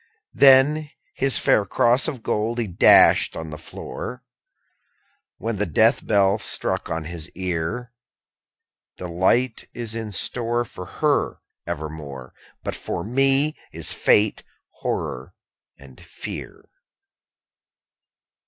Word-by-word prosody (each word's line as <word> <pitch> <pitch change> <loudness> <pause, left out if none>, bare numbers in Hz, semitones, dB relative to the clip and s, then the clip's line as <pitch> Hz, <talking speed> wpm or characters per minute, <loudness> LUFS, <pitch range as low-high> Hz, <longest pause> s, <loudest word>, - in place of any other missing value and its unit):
_20 - - -35
4. - - -37 0.3
Then 140 +3 +6 0.2
his 135 -1 +3
fair 105 - +3
cross 120 +5 +2
of 135 -8 -5
gold 110 +3 -1
he 120 - 0
dashed 90 -4 +5
on 80 -1 -7
the - - -6
floor, 125 +9 -8 1.1
When 115 -1 -3
the 105 +1 -1
death 80 - +3
knell 100 +1 +2
struck - - -1
on 80 0 -3
his 80 0 -7
ear. 95 +7 -4 1.0
'Delight 95 +8 0
is 115 -2 -5
in 110 -2 -5
store 120 +3 -1
For 90 -4 -10
her 150 +8 -1 0.3
evermore; 75 -5 -7 0.3
But - - -3
for 85 - -5
me 135 +6 +2 0.2
is 80 0 -1
fate, 105 0 +2 0.4
horror, - - -4 0.4
and 65 -2 -16
fear.' - - -8
105 Hz, 115 wpm, -22 LUFS, 85-125 Hz, 1.1 s, Then